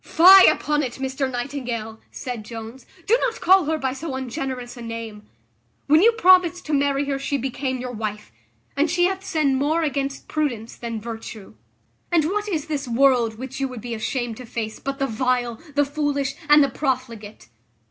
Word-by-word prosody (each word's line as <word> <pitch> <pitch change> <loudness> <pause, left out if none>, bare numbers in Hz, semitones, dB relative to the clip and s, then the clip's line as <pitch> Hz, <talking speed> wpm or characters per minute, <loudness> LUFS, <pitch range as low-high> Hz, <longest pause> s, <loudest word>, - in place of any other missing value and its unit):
"Fie 375 +4 +8
upon 300 0 0
it, 255 -4 -3
Mr 265 0 -3
Nightingale!" 245 -4 -4
said 245 -5 -6
Jones, 225 +3 -9 0.2
"do 445 - +4
not 480 -2 -1
call 375 -2 +5
her 315 +1 0
by 265 -3 -2
so 275 0 -5
ungenerous 255 -1 -5
a 240 - -10
name: 230 -2 -7 0.6
when 305 +3 +5
you 460 +4 +6
promised 365 -5 +4
to 305 - -3
marry 280 0 +1
her 275 -1 -2
she 280 +1 -1
became 260 0 -3
your 250 0 -5
wife; 210 - -5 0.4
and 295 +3 +1
she 350 +2 +1
hath 385 +1 -1
sinned 305 -7 +1
more 310 +5 +1
against 275 -2 -3
prudence 245 -8 -2
than 230 -2 -5
virtue. 225 -2 -8 0.6
And 330 -3 +3
what 415 +5 -2
is 315 -6 -2
this 285 -3 -3
world 240 -2 +3
which 265 +2 -7
you 270 - 0
would 250 -4 -8
be 240 +1 -5
ashamed 230 +1 -3
to 255 - -9
face 220 -2 -5
but 275 0 -4
the 275 - 0
vile, 245 -1 -1
the 290 0 +3
foolish, 285 -1 -1 0.2
and 295 0 +7
the 280 - +1
profligate? 245 - -4
265 Hz, 185 wpm, -23 LUFS, 235-295 Hz, 0.6 s, Fie